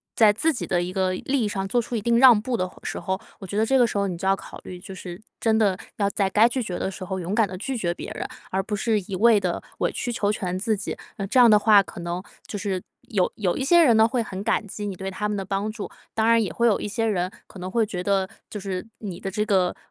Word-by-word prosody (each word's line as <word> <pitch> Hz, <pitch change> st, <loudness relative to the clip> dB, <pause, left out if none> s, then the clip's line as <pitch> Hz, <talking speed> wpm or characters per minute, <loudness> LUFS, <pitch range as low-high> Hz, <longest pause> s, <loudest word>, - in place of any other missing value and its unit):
在 220 Hz, -2 st, +6 dB
自 315 Hz, +10 st, +1 dB
己 245 Hz, -, -4 dB
的 175 Hz, -1 st, +1 dB
一 180 Hz, +1 st, -4 dB
个 185 Hz, -1 st, +1 dB
利 265 Hz, +8 st, -1 dB
益 -, -, +1 dB
上 195 Hz, -2 st, -2 dB
做 240 Hz, +5 st, +2 dB
出 240 Hz, +1 st, -5 dB
一 220 Hz, -, -1 dB
定 235 Hz, +2 st, +2 dB
让 245 Hz, -3 st, +8 dB
步 245 Hz, +3 st, -2 dB
的 185 Hz, -, 0 dB
话 -, -, -17 dB
时 -, -, -4 dB
候。 190 Hz, +2 st, -2 dB, 0.2 s
我 195 Hz, -, -8 dB
觉 200 Hz, -, -4 dB
得 220 Hz, -, +3 dB
这 270 Hz, +4 st, +3 dB
个 245 Hz, -, +6 dB
时 220 Hz, -, -2 dB
候 200 Hz, 0 st, +1 dB
你 180 Hz, -3 st, -4 dB
就 190 Hz, -, -3 dB
要 195 Hz, -, +4 dB
考 -, -, -11 dB
虑， 180 Hz, -, -8 dB
就 190 Hz, -, -9 dB
是 180 Hz, 0 st, -8 dB, 0.2 s
真 220 Hz, -1 st, +2 dB
的 200 Hz, -4 st, +2 dB, 0.2 s
要 200 Hz, -1 st, +2 dB
在 200 Hz, -2 st, +1 dB
该 215 Hz, +4 st, +5 dB
拒 255 Hz, +1 st, -1 dB
绝 180 Hz, -5 st, -4 dB
的 -, -, -1 dB
时 190 Hz, -, -8 dB
候 190 Hz, +1 st, -3 dB
勇 180 Hz, +2 st, -3 dB
敢 225 Hz, -2 st, +3 dB
地 185 Hz, 0 st, -7 dB
拒 255 Hz, +7 st, -3 dB
绝 175 Hz, -6 st, -1 dB
别 -, -, -7 dB
人， -, -, -4 dB, 0.2 s
而 190 Hz, -, +1 dB
不 210 Hz, +1 st, -3 dB
是 215 Hz, +1 st, +1 dB
一 190 Hz, +1 st, -6 dB
味 220 Hz, +2 st, +5 dB
地 -, -, -2 dB, 0.2 s
委 -, -, +1 dB
曲 245 Hz, -, -3 dB
求 205 Hz, -3 st, +1 dB
全 185 Hz, -3 st, -2 dB
自 215 Hz, +3 st, 0 dB
己。 190 Hz, -, -5 dB, 0.2 s
那 195 Hz, -, -2 dB
这 255 Hz, -, +3 dB
样 240 Hz, -2 st, +8 dB
的 210 Hz, -1 st, +7 dB
话 210 Hz, -2 st, +6 dB
可 190 Hz, -, -10 dB
能 175 Hz, +1 st, -4 dB, 0.2 s
就 205 Hz, -, -4 dB
是 195 Hz, -2 st, -2 dB, 0.3 s
有 195 Hz, -7 st, +2 dB
有 185 Hz, -5 st, 0 dB
一 -, -, -1 dB
些 340 Hz, +5 st, +6 dB
人 240 Hz, -7 st, +5 dB
呢， 220 Hz, 0 st, +6 dB
会 235 Hz, 0 st, 0 dB
很 190 Hz, -3 st, -6 dB
感 220 Hz, 0 st, +1 dB
激 210 Hz, +1 st, -6 dB
你 195 Hz, -, -4 dB
对 190 Hz, +1 st, -5 dB
他 210 Hz, +3 st, -2 dB
们 210 Hz, -, -2 dB
的 195 Hz, -, -2 dB
帮 195 Hz, +2 st, -2 dB
助， 215 Hz, -1 st, -6 dB, 0.2 s
当 220 Hz, -, +1 dB
然 230 Hz, 0 st, +5 dB
也 205 Hz, -, -2 dB
会 235 Hz, -, +1 dB
有 220 Hz, -4 st, +4 dB
一 -, -, -3 dB
些 225 Hz, +2 st, -1 dB
人 185 Hz, -5 st, 0 dB, 0.2 s
可 190 Hz, -, -13 dB
能 180 Hz, +1 st, -5 dB
会 225 Hz, +3 st, +2 dB
觉 190 Hz, -4 st, -4 dB
得 195 Hz, -1 st, +1 dB, 0.2 s
就 -, -, -6 dB
是 190 Hz, 0 st, -4 dB
你 190 Hz, -5 st, -6 dB
的 195 Hz, -, -4 dB
这 210 Hz, +2 st, -1 dB
个 185 Hz, -4 st, +2 dB
205 Hz, 325 characters per minute, -24 LUFS, 190-225 Hz, 0.3 s, 让